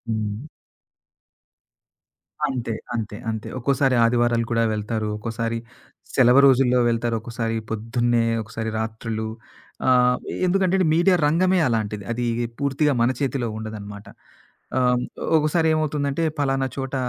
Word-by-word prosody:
హ్మ్. 110 +5 -3 2.0
అంతే. 120 -4 -3 0.2
అంతే. 105 -2 -3
అంతే. 110 0 -5
ఒక్కోసారి 135 +1 +2
ఆదివారాలు 120 0 +2
కూడా 115 -1 +2
వెళ్తారు. 105 0 -2
ఒక్కోసారి 115 +1 -3 0.6
సెలవు 125 +1 +6
రోజుల్లో 125 -1 +4
వెళ్తారు. 115 0 0
ఒకసారి 115 -1 -3
పొద్దున్నే 115 +2 0 0.2
ఒకసారి 110 +1 -5
రాత్రులు 110 0 -4 0.6
ఆహ్, 125 -1 +4 0.3
ఎందుకంటే 190 0 +2 0.2
మీడియా 175 +3 +4
రంగమే 180 +5 +3
అలాంటిది. 105 -3 -1
అది 120 +1 -2 0.3
పూర్తిగా 140 +1 +1
మన 120 +2 +3
చేతిలో 135 -3 -1
ఉండదనమాట. 105 -2 -8 0.7
ఆహ్, 125 -1 +2 0.4
ఒకసారి 155 +2 +1
ఏమవుతుందంటే 150 0 -1 0.2
పలానా 135 -2 +1
చోట 135 0 -4
120 Hz, 110 wpm, -23 LUFS, 115-135 Hz, 2.0 s, సెలవు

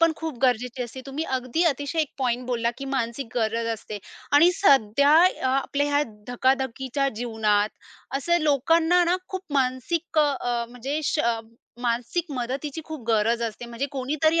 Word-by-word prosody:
पण 330 -1 +5
खूप 320 -6 -5
गरजेची 250 0 +1
असते. 245 +2 -7
तुम्ही 285 +4 -3
अगदी 255 +7 -1
अतिशय 290 +1 0
एक 305 - -2
पॉइंट 250 -1 -1
बोलला, 235 -2 0
की 275 - -5
मानसिक 235 +1 -2
गरज 230 0 0
असते. 210 -1 -8 0.3
आणि 305 +5 +7
सध्या 280 - +4
य - - -9
अ, - - 0
आपल्या 275 +2 0
ह्या 290 - +4 0.3
धकाधकीच्या 265 +2 0
जीवनात 215 -3 +1 0.5
असं 345 +5 +2
लोकांना 325 +5 +3
ना, 350 +2 +2
खूप 375 0 -4
मानसिक 280 +5 0
अ, 295 -1 +5
अ, 240 -1 -1
म्हणजे 265 +5 -4
श 255 - 0 0.6
मानसिक 245 +8 -1
मदतीची 270 +5 -3
खूप 310 -6 -7
गरज 230 +1 +2
असते, 230 +1 -4
म्हणजे 235 +4 -3
कोणीतरी 305 +5 +1
265 Hz, 160 wpm, -25 LUFS, 235-300 Hz, 0.6 s, आणि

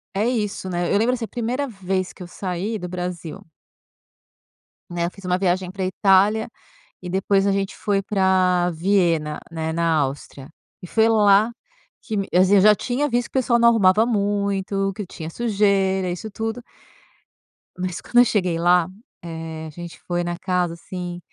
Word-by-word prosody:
É 210 +4 +1
isso, 210 -5 -2
né. 175 0 -1
Eu - - +4
lembro 235 +3 +2
assim, 230 - -4
a - - -11
primeira 245 +6 -2
vez 190 -4 -3
que - - -17
eu 180 - -7
saí 190 +4 -4
do 180 -3 -6
Brasil 180 -2 -6 1.5
né, 170 -1 -1
eu 175 - -3
fiz 195 0 -14
uma 180 0 +1
viagem 185 -1 0
pra 190 0 -3
Itália 195 +4 +3 0.5
e 180 - -6
depois 195 +1 +1
a 200 - +3
gente 195 0 -2
foi 200 -1 0
pra 185 -3 +2
Viena, 170 -3 +1
né, 160 -1 -3
na 165 0 +1
Áustria, 135 -1 -4 0.3
e - - -7
foi 220 +5 +3
lá 210 0 +4 0.5
que 220 - -4
me 195 -1 -2
assim, 185 +3 +5
eu - - +6
já 210 +2 +7
tinha 255 +7 -1
visto 245 -2 0
que - - 0
o - - +4
pessoal 240 -1 +2
não 235 0 +6
arrumava 210 -1 +4
muito, 200 -2 0
que 205 -2 -6
tinha 160 -2 -8
sujeira, 195 -3 +1
isso 180 +5 -5
tudo 225 +3 -4 1.2
mas 180 -1 -3
quando 240 - +2
eu 245 - +8
cheguei 180 -7 0
lá, 175 0 +4 0.4
eh, 160 -1 -6
a - - -7
gente 170 +2 -9
foi 175 0 -1
na 175 0 -3
casa, 180 -2 -1
assim, 175 0 -7
190 Hz, 180 wpm, -22 LUFS, 175-210 Hz, 1.5 s, eu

